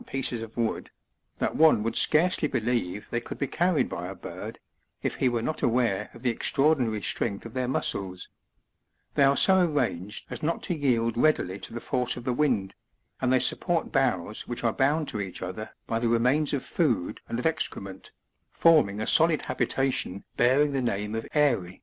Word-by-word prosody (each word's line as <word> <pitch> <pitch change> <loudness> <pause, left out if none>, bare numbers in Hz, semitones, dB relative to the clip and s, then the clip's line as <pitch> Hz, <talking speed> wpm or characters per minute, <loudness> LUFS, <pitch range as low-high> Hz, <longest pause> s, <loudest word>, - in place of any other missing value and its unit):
25 - - -19
pieces 125 -3 0
of 115 0 -9
wood, 115 -2 -2 0.5
that - - -1
one 155 -9 +5
would 115 - -2
scarcely 160 0 +4
believre 115 -5 -1
they 120 - -1
could - - -8
be 140 - -1
carried 175 +3 +1
by 90 +1 -5
a 95 - -7
bird, 85 - -8 0.5
if - - -1
he 130 - +1
were 120 -2 -2
not 155 - -3
aware 115 -4 +1
of 120 - -13
the 125 - +2
extraordinary 125 -4 +1
strength 100 +2 -1
of 115 - -9
their 130 -1 -1
muscles; 95 -7 -2 0.9
they - - 0
are 140 0 +5
so 190 -1 +6
arranged 115 - -2
as - - -5
not 165 +2 -2
to 175 - -2
yield 115 -6 +1
readily 120 -9 +1
to - - -8
the 120 - -5
force 125 +1 -1
of - - -7
the 125 -1 -1
wind, 120 -9 0 0.5
and 130 - +1
they 130 - +5
support 170 +5 +1
boughs 110 - -1
which 120 - -5
are 115 -1 +1
bound 145 +3 +1
to 105 - -3
each 95 -2 -6
other 95 +4 -6 0.2
by 115 - -1
the 115 0 0
remains 125 +6 +2
of 140 - -2
food 125 - -1
and 115 - -2
of 125 - -4
excre 160 0 -1
ment, 95 -1 -10 0.4
forming 150 -12 +3
a 110 - -2
solid 160 -2 +4
habitation 130 -8 -1
bearing 135 +5 +3
the 135 -1 -1
name 105 -3 -2
of 115 0 -4
eyry. 120 -12 +1
120 Hz, 195 wpm, -27 LUFS, 105-145 Hz, 0.9 s, so